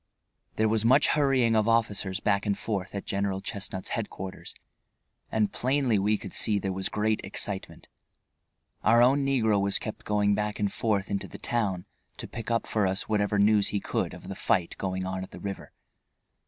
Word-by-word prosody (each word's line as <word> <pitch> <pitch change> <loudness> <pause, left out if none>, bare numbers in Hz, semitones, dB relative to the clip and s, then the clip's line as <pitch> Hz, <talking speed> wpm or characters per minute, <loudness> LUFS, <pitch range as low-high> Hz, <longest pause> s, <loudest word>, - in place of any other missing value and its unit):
There 110 - +2
was 110 0 +1
much 120 +3 +5
hurrying 135 -6 +3
of 110 0 +3
officers 105 -4 +1
back 100 0 +1
and 100 - +1
forth 100 -3 -3
at 100 - -4
General 100 -1 -1
Chestnut's 95 -1 -5
headquarters, 95 -4 -5 0.8
and 110 -2 +1
plainly 130 -4 +1
we 105 +2 +2
could 95 - -9
see 105 -2 +2
there 95 -1 -2
was 95 0 -1
great 110 0 0
excitement. 95 0 -4 1.0
Our 115 +2 +6
own 135 +3 +4
negro 110 -7 +2
was 100 0 +1
kept 110 - -6
going 105 -1 +2
back 105 0 -2
and 100 -1 0
forth 105 -4 0
into 100 - -2
the - - -10
town 100 -7 -1 0.3
to - - -6
pick 115 -1 -7
up 115 -1 +1
for 105 -3 +1
us 95 +1 -2
whatever 105 -1 +1
news 105 0 +4
he 105 - -1
could - - -2
of - - -12
the - - -4
fight 85 -2 +1
going 95 -1 -2
on 95 0 -3
at 95 - -7
the - - -10
river. 100 +2 -6
105 Hz, 185 wpm, -28 LUFS, 100-110 Hz, 1.0 s, Our